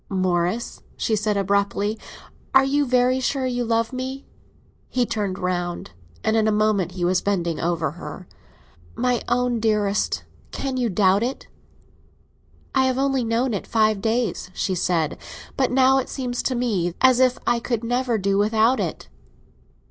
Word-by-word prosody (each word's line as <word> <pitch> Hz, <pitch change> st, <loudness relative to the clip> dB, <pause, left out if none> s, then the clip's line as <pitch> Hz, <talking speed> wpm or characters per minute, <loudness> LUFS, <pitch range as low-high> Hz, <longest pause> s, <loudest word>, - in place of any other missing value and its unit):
"Morris," 185 Hz, +3 st, -1 dB, 0.2 s
she 220 Hz, -, 0 dB
said 210 Hz, 0 st, 0 dB
abruptly, 200 Hz, +2 st, 0 dB, 0.6 s
"are 270 Hz, -, +8 dB
you 285 Hz, +1 st, +1 dB
very 250 Hz, +1 st, +3 dB
sure 260 Hz, +1 st, -1 dB
you 245 Hz, -1 st, -1 dB
love 230 Hz, +1 st, 0 dB
me?" 260 Hz, +2 st, -5 dB, 0.6 s
He 250 Hz, -1 st, +1 dB
turned 205 Hz, -4 st, -2 dB
round, 175 Hz, -2 st, -3 dB, 0.3 s
and 220 Hz, -, +1 dB
in 220 Hz, -1 st, +3 dB
a -, -, +3 dB
moment 210 Hz, -4 st, +1 dB
he 180 Hz, -2 st, -2 dB
was 180 Hz, +1 st, +2 dB
bending 175 Hz, -5 st, -1 dB
over 165 Hz, -3 st, -1 dB
her. 175 Hz, +2 st, -9 dB, 0.7 s
"My 250 Hz, -1 st, 0 dB
own 245 Hz, 0 st, +1 dB
dearest, 210 Hz, -2 st, 0 dB, 0.3 s
can 270 Hz, -2 st, -4 dB
you 245 Hz, -2 st, 0 dB
doubt 195 Hz, 0 st, +3 dB
it?" 250 Hz, +3 st, -3 dB, 1.3 s
"I 265 Hz, -1 st, +3 dB
have 260 Hz, -1 st, +1 dB
only 270 Hz, -1 st, +1 dB
known 230 Hz, +2 st, 0 dB
it 200 Hz, -, -4 dB
five 215 Hz, -2 st, +2 dB
days," 225 Hz, -3 st, -1 dB
she 190 Hz, -, -1 dB
said; 170 Hz, -3 st, 0 dB, 0.4 s
"but 265 Hz, -, +1 dB
now 265 Hz, +1 st, +4 dB
it 260 Hz, -, -4 dB
seems 250 Hz, -3 st, -3 dB
to 255 Hz, -, 0 dB
me 195 Hz, -8 st, -1 dB
as 260 Hz, -1 st, +5 dB
if 255 Hz, -1 st, +3 dB
I 240 Hz, 0 st, +2 dB
could 235 Hz, -1 st, -2 dB
never 245 Hz, 0 st, 0 dB
do 195 Hz, 0 st, +1 dB
without 220 Hz, +4 st, +3 dB
it." 170 Hz, -, -4 dB
225 Hz, 160 wpm, -23 LUFS, 195-250 Hz, 1.3 s, are